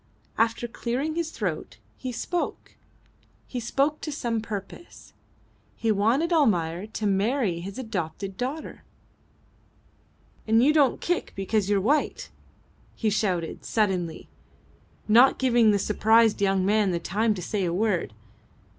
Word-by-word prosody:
After 230 +1 +1
clearing 250 +6 -3
his 335 0 -2
throat 185 - -4 0.2
he 255 - -5
spoke. 345 +8 -4 0.7
He 250 - -5
spoke 275 +6 0
to 305 - -4
some 235 -6 -2
purpose. 210 - -8 0.6
He 225 - 0
wanted 235 - +2
Almayer 185 - +1
to 220 0 -5
marry 200 -1 +1
his 195 +3 -7
adopted 195 -5 -4
daughter. 265 +9 -5 1.7
"And 220 +1 +4
don't 290 -4 +4
you - - -12
kick 355 0 -2
because 195 +1 -1
you're 205 -1 +3
white!" 275 +10 0 0.6
he 220 -2 0
shouted, 185 -6 -1
suddenly, 185 -7 -1 0.8
not 240 +5 +6
giving 240 -4 +4
the 205 - +4
surprised 220 +2 +3
young 195 -1 +2
man 210 0 +3
the 175 -2 -1
time 215 +5 0
to 185 - -6
say 200 +2 -2
a 175 - 0
word. 185 - -1
220 Hz, 130 wpm, -26 LUFS, 195-250 Hz, 1.7 s, not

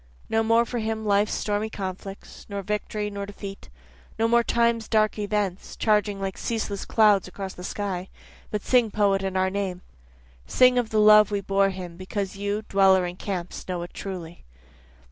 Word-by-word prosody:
No 225 - +2
more 230 +1 +3
for 240 0 -3
him 220 0 -3
life's 205 0 +2
stormy 210 +1 -1
conflicts, 195 -1 -7
Nor 200 -1 -4
victory, 210 +1 -3
nor 200 0 -5
defeat 200 - -9 0.5
no 225 +1 +2
more 235 +1 +4
time's 235 -1 +1
dark 215 -1 +2
events, 205 -3 -2
Charging 210 -2 +1
like 195 -1 -4
ceaseless 215 -4 -3
clouds 210 -4 +4
across 190 +1 -6
the 180 - -10
sky. 190 -2 -4 0.4
But 210 -1 -3
sing 245 -3 +3
poet 200 -2 +2
in 190 -1 -2
our 190 0 +1
name, 190 -2 -3 0.7
Sing 250 -1 +5
of 235 -3 -2
the 215 - +1
love 210 -1 +7
we 205 -1 -1
bore 195 0 +2
him 180 -3 -7
because 190 +1 -4
you, 205 +2 -2
dweller 190 -2 +4
in 175 0 -5
camps, 185 -2 -5
know 180 -2 -3
it 175 - -10
truly. 175 -4 -7
200 Hz, 175 wpm, -25 LUFS, 190-215 Hz, 0.7 s, love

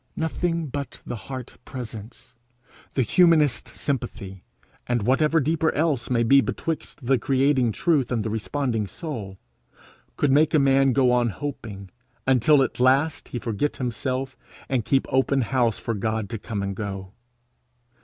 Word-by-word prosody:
Nothing 165 +1 -1
but 140 -1 -5
the - - -4
heart 130 -2 -7
presence, 120 -1 -9 0.6
the 130 - +3
humanest 155 - +3
sympathy, 100 -9 -4 0.4
and 120 -3 0
whatever 150 +7 +3
deeper 160 +2 +1
thing - - -3
else 150 -7 0
may 120 -2 +2
be 135 +4 +6
betwixt 155 -2 -4
the 130 0 +3
creating 135 -3 +2
Truth 150 - +1
and 115 -3 0
the 110 - -3
responding 110 -1 -2
soul, 100 - -6 0.8
could 145 - +2
make 150 +3 +4
a - - +6
man 135 -1 +4
go 130 -2 +4
on 120 -1 +2
hoping, 105 -7 -6 0.3
until 135 +2 +5
at 130 - -4
last 140 +4 +2
he - - -5
forget 115 +5 -2
himself, 130 +2 -3 0.3
and 125 -5 -1
keep 135 -1 +2
open 135 +1 +2
house 120 -2 +1
for 115 - -3
God 110 0 -2
to 115 - -4
come 100 -1 -4
and 100 0 -3
go. 95 -2 -6
130 Hz, 155 wpm, -24 LUFS, 115-145 Hz, 0.8 s, be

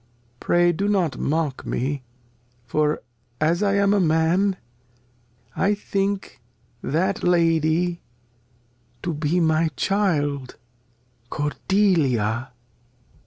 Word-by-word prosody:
Pray 175 0 +3
do 195 +5 -1
not 190 -7 0
mock 150 -3 -1
me. 135 +2 -2 0.6
For, 150 +3 0 0.4
as 165 +4 +1
I 200 -1 +2
am 200 0 +3
a 205 - +3
Man, 175 +4 +2 1.0
I 205 +2 +2
think 200 -4 -3 0.4
that 185 +7 0
Lady 170 0 +2 1.0
To 175 - -1
be 155 +3 0
my 160 -1 +2
Child 145 -10 0 0.7
Cordelia. 145 - +1
165 Hz, 90 wpm, -23 LUFS, 150-190 Hz, 1.0 s, Pray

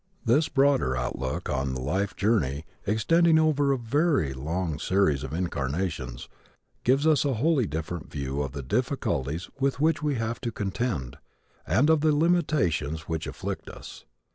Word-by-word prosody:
This 140 +7 +3
broader 135 - +2
outlook 65 +1 -3
on 65 0 -1
the - - -3
life 95 +10 -1
journey, 80 - +1 0.2
extending 160 - +4
over 150 -3 +3
a 135 - +2
very 130 - +1
long 80 +3 -3
series 90 -5 +2
of 65 - -5
incarnations, 75 -5 -3 0.6
gives 135 +4 +3
us 155 -4 +4
a 140 -3 0
wholly 140 0 +2
different 80 +2 -5
view 70 -1 -3
of 70 -2 -4
the 70 -2 -5
difficulties 70 +5 -1
with 135 -1 0
which 160 +2 +2
we 150 -2 0
have 115 0 -3
to 120 - -2
contend 95 - -3 0.5
and 140 - +3
of 160 -2 +3
the 155 -1 +3
limitations 145 - +1
which 80 +1 -4
afflict - - -5
us. - - -11
95 Hz, 155 wpm, -27 LUFS, -, 0.6 s, extending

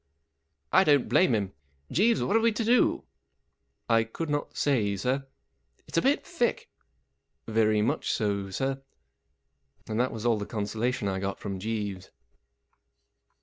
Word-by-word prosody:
" - - -41
I - - +6
don't 145 -6 +3
blame 180 -10 +4
him. 100 -3 -2 0.4
Jeeves, 225 +6 +3
what 200 - 0
are - - +6
we 230 +1 +3
to 220 +1 -2
do? 240 +2 +3 0.4
" - - -50
44 115 - +3
I 115 - +3
could 150 +8 -5
not 145 0 -3
say, 110 -8 +1
sir." 125 +7 0 0.6
44 - - -45
It's - - -5
a - - 0
bit - - +2
thick." - - -1 0.8
44 110 - -7
Very 110 -1 +3
much 145 +7 0
so, 100 -5 -1
sir." 135 +6 -2 1.1
And 110 +1 -2
that 125 +1 +1
was 110 0 -6
all 115 -3 +3
the 105 - -5
consolation 110 +2 -2
I 95 -1 -1
got 100 +1 -3
from 100 -2 -5
Jeeves. 100 -3 -4
115 Hz, 170 wpm, -28 LUFS, 105-145 Hz, 1.1 s, I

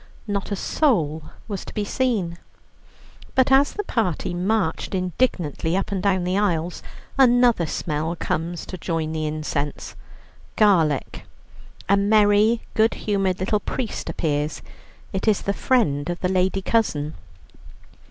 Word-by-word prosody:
Not 205 -1 -3
a - - +1
soul 170 - +1 0.3
was 200 -4 -4
to - - -11
be 210 - -1
seen. 205 -9 -1 1.0
But 260 0 +3
as 275 +2 +5
the 415 - -3
party 185 - -1
marched 190 0 -1
indignantly 180 - 0
up 195 - -2
and 195 -2 -1
down 190 -2 +1
the 185 +2 0
aisles, 175 -4 -1 0.4
another 245 -8 +5
smell 155 +1 -2
comes 165 +1 -3
to 185 - -8
join 160 -2 -2
the 155 -1 -2
incense 150 -1 -3 0.6
garlic. 165 - +2 0.6
A 200 - +4
merry, 210 +2 +4
good 220 +1 +3
humoured 195 -3 0
little 205 +3 +1
priest 240 +2 -4
appears; 150 -1 -2 0.5
it 190 +3 -2
is 215 -2 +3
the 200 - 0
friend 175 - +1
of 175 0 -3
the 180 - +1
lady 190 +1 +1
cousin. 160 -11 0
190 Hz, 135 wpm, -23 LUFS, 165-215 Hz, 1.0 s, as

